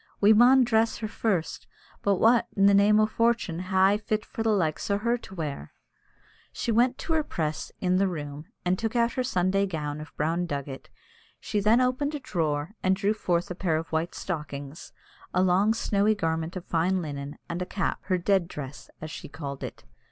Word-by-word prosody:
"We 210 +2 +6
maun 250 +4 +6
dress 225 -1 +2
her 220 - -4
first; 200 -6 -2 0.3
but 200 -1 +2
what, 230 +5 +4
in 195 - +5
the 200 - +6
name 205 +2 +5
o' 215 - +5
fortune, 230 -6 0
hae 185 +1 -2
I 200 +2 +4
fit 215 0 -2
for - - -6
the 225 - +1
likes 180 -7 0
o' 200 - +2
her 235 +3 +1
to 210 -5 -10
wear?" 150 -5 -5 0.8
She 235 - -2
went 245 +3 +3
to 325 - -3
her 315 - +3
press 155 - -3
in 185 0 +2
"the 195 +1 +3
room," 150 -3 -5 0.2
and 180 +1 +1
took 225 +1 -2
out 235 0 +3
her 255 - -1
Sunday 195 -3 +1
gown 150 -4 -4
of 155 - -10
brown 165 +4 0
drugget; 140 -3 -5 0.5
she 210 - -2
then 215 +4 +4
opened 260 +4 0
a - - -3
drawer, 155 - -2
and 185 0 +3
drew 200 +2 +1
forth 175 -5 -1
a - - -1
pair 175 -3 0
of 165 +1 -5
white 160 +2 -1
stockings, 150 -3 -6 0.4
a 180 - +4
long 190 +4 +3
snowy 215 -1 +1
garment 160 -1 -2
of 185 - -6
fine 175 +3 +1
linen, 145 -1 -6
and 170 +1 -4
a 180 - -3
cap, 195 - -2
her 185 - +1
"dead 185 0 +2
dress," 145 -4 -8
as 155 0 -6
she - - -8
called 140 -2 -6
it. - - -7
185 Hz, 205 wpm, -27 LUFS, 160-215 Hz, 0.8 s, We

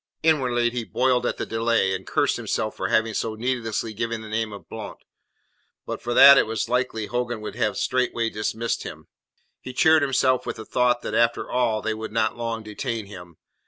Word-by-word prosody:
Inwardly 125 -7 +2
he 120 -1 -3
boiled 125 +2 +1
at - - -2
the - - -3
delay, 115 -4 +1
and 95 0 -5
cursed - - +1
himself - - -2
for - - -2
having 110 0 +1
so 110 +1 -2
needlessly 115 -2 -2
given 115 +1 -3
the 110 - -9
name 110 0 -2
of 100 - -10
Blount. - - -8 0.9
But - - -5
for 120 0 -3
that, 140 +1 +10
it - - +1
was 110 -1 -2
likely 120 -3 -1
Hogan 120 0 -3
would 105 - -6
have 105 -3 -1
straightway 120 -3 0
dismissed 110 +2 -2
him. - - -9 0.5
He 130 - -8
cheered 160 +3 +5
himself 130 -2 +2
with - - -3
the 110 - -9
thought 125 -1 +1
that - - -4
after 115 0 +2
all 115 -4 +1
they 110 - -1
would 110 0 -6
not 110 0 0
long 115 -1 -4
detain 110 +1 -4
him. 90 -5 -12
115 Hz, 195 wpm, -24 LUFS, 110-125 Hz, 0.9 s, that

